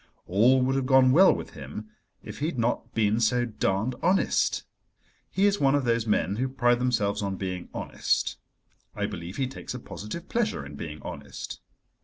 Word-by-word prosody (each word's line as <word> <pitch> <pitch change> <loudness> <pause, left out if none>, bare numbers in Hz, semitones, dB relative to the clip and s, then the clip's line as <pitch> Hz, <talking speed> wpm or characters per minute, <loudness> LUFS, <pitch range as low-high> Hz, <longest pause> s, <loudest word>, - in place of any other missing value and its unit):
All 120 +8 +4
would 130 +1 +1
have 135 -1 0
gone 130 -1 +6
well 185 +8 +7
with - - -4
him 90 +11 -8 0.3
if - - -8
he 150 - 0
had 165 - -4
not 120 0 -1
been 110 0 +2
so 120 +2 +2
darned 110 +1 -1
honest. 185 +3 +2 0.7
He 195 - +2
is 205 0 +3
one 135 0 +4
of 140 -3 +1
those 115 -1 +1
men 105 -1 +1
who 130 +2 0
pride 120 -2 +2
themselves 110 -6 +1
on 100 -1 -2
being 95 -1 -4
honest. - - -1 0.6
I - - -1
believe 85 +3 -6
he 135 - +1
takes 130 -1 -7
a - - -5
positive 115 - -7
pleasure 215 - -1
in 70 - -9
being 75 +1 -7
honest. - - -7
120 Hz, 185 wpm, -27 LUFS, 100-130 Hz, 0.7 s, well